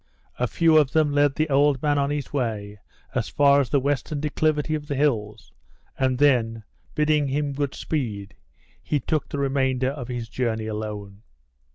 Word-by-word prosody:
A 125 - +1
few 155 - +4
of 140 -3 +1
them 155 -2 +3
led 145 -1 +2
the 155 +1 +1
old 140 0 +3
man 145 -1 +2
on 140 0 +1
his 145 -1 -4
way, 105 -6 -3 0.3
as - - -1
far 140 0 +4
as 130 - -3
the 140 - +3
western 145 +2 -1
declivity 155 +1 0
of 150 -1 -3
the 145 - -2
hills, 110 - -1 0.4
and 130 -1 0
then, 120 -5 +2 0.3
bidding 150 -1 +2
him 140 +1 -1
good 140 -1 -2
speed, 105 -10 -4 0.5
he 150 - -1
took 150 +5 -2
the - - -4
remainder 130 -2 +1
of 135 -4 -7
his 120 -2 -4
journey 110 -1 -2
alone. 105 -2 -6
140 Hz, 175 wpm, -24 LUFS, 115-145 Hz, 0.5 s, few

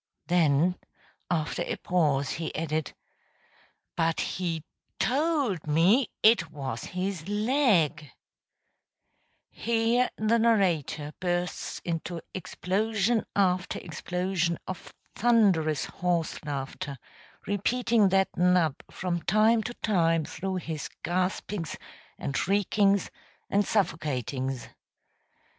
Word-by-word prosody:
Then 170 0 +3 0.5
after 160 -4 -1
a - - -2
pause 145 -6 +1
he 165 -1 -4
added, 155 -1 -2 1.0
"But 165 0 +1
he 165 -4 -2 0.3
TOLD 275 - +1
me 185 - +4
IT 215 -7 +5
WAS 135 -6 -5
HIS 185 -2 -3
LEG 205 - +2 0.7
" - - -60 0.6
Here 235 +2 +1
the 220 +2 +2
narrator 175 - +1
bursts 180 -1 -2
into 170 0 -3
explosion 210 +4 0
after 185 -2 +1
explosion 180 +1 -2
of 185 -2 -7 0.2
thunderous 195 -10 +3
horse 175 -3 -2
laughter, 140 -1 -4 0.5
repeating 220 +1 +2
that 190 0 +2
nub 175 -5 +3
from 175 -2 -2
time 220 +5 +4
to 240 +2 -6
time 165 -6 +2
through 190 0 -4
his 160 -4 -4
gaspings 180 -1 -2 0.4
and 140 - -4
shriekings 200 +2 +2 0.4
and 200 +1 +2
suffocatings. 135 - -1
180 Hz, 95 wpm, -28 LUFS, 160-205 Hz, 1.0 s, IT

